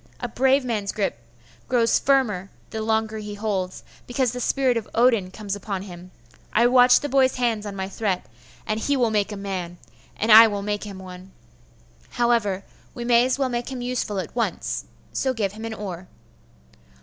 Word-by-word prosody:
A 245 Hz, -, -3 dB
brave 265 Hz, +3 st, +2 dB
man's 210 Hz, -5 st, -1 dB
grip 200 Hz, -, -2 dB, 0.5 s
grows 235 Hz, -2 st, +3 dB
the -, -, -18 dB
firmer 220 Hz, -9 st, +2 dB, 0.2 s
the 220 Hz, -, -4 dB
longer 220 Hz, 0 st, 0 dB
he 210 Hz, -1 st, -6 dB
holds, 200 Hz, -3 st, -3 dB, 0.2 s
because 245 Hz, -1 st, 0 dB
the 250 Hz, -, -5 dB
spirit 260 Hz, 0 st, +1 dB
of 230 Hz, -2 st, -3 dB
Odin 230 Hz, -6 st, +3 dB
comes 200 Hz, +1 st, -5 dB
upon 195 Hz, -1 st, -4 dB
him. 180 Hz, -2 st, -10 dB, 0.4 s
I 235 Hz, -, +4 dB
watched 245 Hz, +1 st, +6 dB
the -, -, 0 dB
boy's 265 Hz, -1 st, +3 dB
hands 230 Hz, -4 st, 0 dB
on 200 Hz, -, -6 dB
my 190 Hz, -1 st, -3 dB
threat; 195 Hz, -2 st, -2 dB, 0.4 s
and 215 Hz, 0 st, -1 dB
he 285 Hz, +5 st, 0 dB
will 240 Hz, -3 st, +2 dB
make 210 Hz, -1 st, 0 dB
a 205 Hz, -, -5 dB
man; 185 Hz, -3 st, -5 dB, 0.4 s
and 220 Hz, +2 st, +1 dB
I 225 Hz, +1 st, +11 dB
will 205 Hz, -2 st, -3 dB
make 205 Hz, 0 st, -2 dB
him 200 Hz, -2 st, -8 dB
one. 185 Hz, 0 st, -11 dB, 0.8 s
However, 230 Hz, -5 st, +1 dB, 0.3 s
we 240 Hz, -, -5 dB
may 240 Hz, 0 st, +5 dB
as 260 Hz, -, 0 dB
well 270 Hz, -2 st, 0 dB
make 240 Hz, +1 st, -3 dB
him 250 Hz, -2 st, -5 dB
useful 245 Hz, -5 st, -2 dB
at 185 Hz, +1 st, -5 dB
once; 235 Hz, -, -2 dB, 0.3 s
so 260 Hz, -1 st, 0 dB
give 205 Hz, -4 st, -1 dB
him 220 Hz, +2 st, -8 dB
an 225 Hz, -, -4 dB
oar. 185 Hz, -4 st, -7 dB
220 Hz, 190 wpm, -24 LUFS, 200-245 Hz, 0.8 s, I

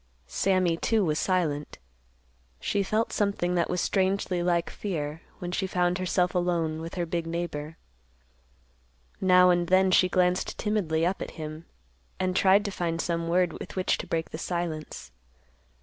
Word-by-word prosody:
Sammy, 185 Hz, -, +1 dB
too, 220 Hz, +2 st, +1 dB
was 155 Hz, -2 st, 0 dB
silent. 160 Hz, -6 st, -1 dB, 0.8 s
She 205 Hz, -, 0 dB
felt 215 Hz, +3 st, 0 dB
something 200 Hz, -4 st, 0 dB
that 175 Hz, -1 st, +1 dB
was 180 Hz, -, 0 dB
strangely 190 Hz, -2 st, 0 dB
like 175 Hz, -1 st, +1 dB
fear, 160 Hz, -5 st, -4 dB, 0.2 s
when 175 Hz, 0 st, -5 dB
she 190 Hz, +1 st, -1 dB
found 180 Hz, 0 st, +1 dB
herself 180 Hz, -1 st, +1 dB
alone 170 Hz, -3 st, 0 dB
with 165 Hz, +1 st, -7 dB
her 175 Hz, -2 st, -1 dB
big 170 Hz, 0 st, -3 dB
neighbor. 165 Hz, -2 st, -4 dB, 1.4 s
Now 180 Hz, -1 st, +6 dB
and 175 Hz, -1 st, +1 dB
then 185 Hz, +1 st, +4 dB
she 185 Hz, 0 st, +5 dB
glanced 180 Hz, 0 st, +1 dB
timidly 175 Hz, -7 st, 0 dB
up 185 Hz, +3 st, -1 dB
at -, -, -4 dB
him 155 Hz, +1 st, -7 dB, 0.5 s
and 185 Hz, 0 st, 0 dB
tried 195 Hz, +2 st, +4 dB
to 200 Hz, -, -2 dB
find 170 Hz, -3 st, -2 dB
some 170 Hz, 0 st, -1 dB
word 175 Hz, -1 st, +2 dB
with -, -, -8 dB
which 185 Hz, -1 st, +1 dB
to -, -, -6 dB
break 165 Hz, -1 st, -2 dB
the 155 Hz, -, -6 dB
silence. 170 Hz, -, -4 dB
175 Hz, 160 wpm, -27 LUFS, 165-185 Hz, 1.4 s, Now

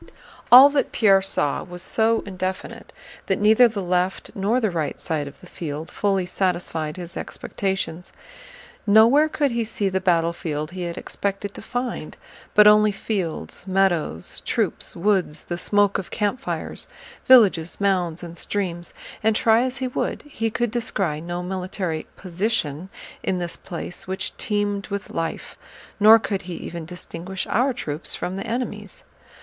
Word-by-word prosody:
All 265 Hz, +4 st, +11 dB
that 285 Hz, -1 st, 0 dB
Pierre 195 Hz, -4 st, +5 dB
saw 170 Hz, -6 st, 0 dB
was 180 Hz, 0 st, -8 dB
so 225 Hz, +3 st, +2 dB
indefinite 185 Hz, -1 st, -5 dB, 0.4 s
that -, -, +1 dB
neither 220 Hz, +4 st, +6 dB
the 210 Hz, -4 st, -4 dB
left 180 Hz, +1 st, -1 dB
nor 205 Hz, +6 st, +1 dB
the 220 Hz, -5 st, 0 dB
right 155 Hz, -4 st, -2 dB
side 155 Hz, -4 st, -2 dB
of 140 Hz, -, -12 dB
the -, -, -13 dB
field 160 Hz, -3 st, -6 dB
fully 195 Hz, -3 st, 0 dB
satisfied 175 Hz, -4 st, -2 dB
his 175 Hz, -1 st, -8 dB
expectations. 190 Hz, -3 st, -4 dB, 0.8 s
Nowhere 230 Hz, +9 st, +6 dB
could 290 Hz, -3 st, 0 dB
he 235 Hz, 0 st, 0 dB
see 215 Hz, -2 st, -1 dB
the 190 Hz, 0 st, -1 dB
battlefield 165 Hz, -3 st, 0 dB
he 185 Hz, 0 st, -6 dB
had 170 Hz, 0 st, -5 dB
expected 200 Hz, 0 st, -4 dB
to -, -, -9 dB
find, 245 Hz, +3 st, -4 dB, 0.4 s
but 210 Hz, -, +8 dB
only 210 Hz, 0 st, +7 dB
fields, 195 Hz, -3 st, -4 dB
meadows, 185 Hz, -, 0 dB
troops, -, -, -1 dB
woods, 180 Hz, -4 st, 0 dB
the 175 Hz, -, -4 dB
smoke 205 Hz, 0 st, +2 dB
of 190 Hz, -, -7 dB
campfires, 210 Hz, +4 st, -2 dB, 0.4 s
villages, 200 Hz, -10 st, +5 dB
mounds, 180 Hz, -4 st, 0 dB
and 170 Hz, 0 st, -8 dB
streams; 175 Hz, -4 st, -3 dB, 0.3 s
and 220 Hz, 0 st, +2 dB
try 225 Hz, +1 st, +4 dB
as 255 Hz, +1 st, -1 dB
he 260 Hz, -, -2 dB
would 250 Hz, -, -3 dB
he 225 Hz, -6 st, -3 dB
could 240 Hz, 0 st, -1 dB
descry 195 Hz, -10 st, -2 dB
no 175 Hz, +1 st, -4 dB
military 180 Hz, -3 st, -3 dB
"position" 185 Hz, -3 st, -2 dB, 0.3 s
in 185 Hz, -, -1 dB
this 175 Hz, -1 st, -3 dB
place 175 Hz, -1 st, -7 dB
which 190 Hz, 0 st, -3 dB
teemed 205 Hz, -2 st, -1 dB
with 200 Hz, -1 st, -5 dB
life, 165 Hz, 0 st, -4 dB, 0.4 s
nor 215 Hz, +2 st, +9 dB
could 200 Hz, -3 st, -3 dB
he 175 Hz, -1 st, -7 dB
even 170 Hz, -1 st, -6 dB
distinguish 180 Hz, +2 st, -6 dB
our 255 Hz, +4 st, +3 dB
troops 155 Hz, -, -3 dB
from 180 Hz, -, -4 dB
the 195 Hz, +3 st, -5 dB
enemy's. 240 Hz, +2 st, -4 dB
190 Hz, 155 wpm, -23 LUFS, 175-215 Hz, 0.8 s, All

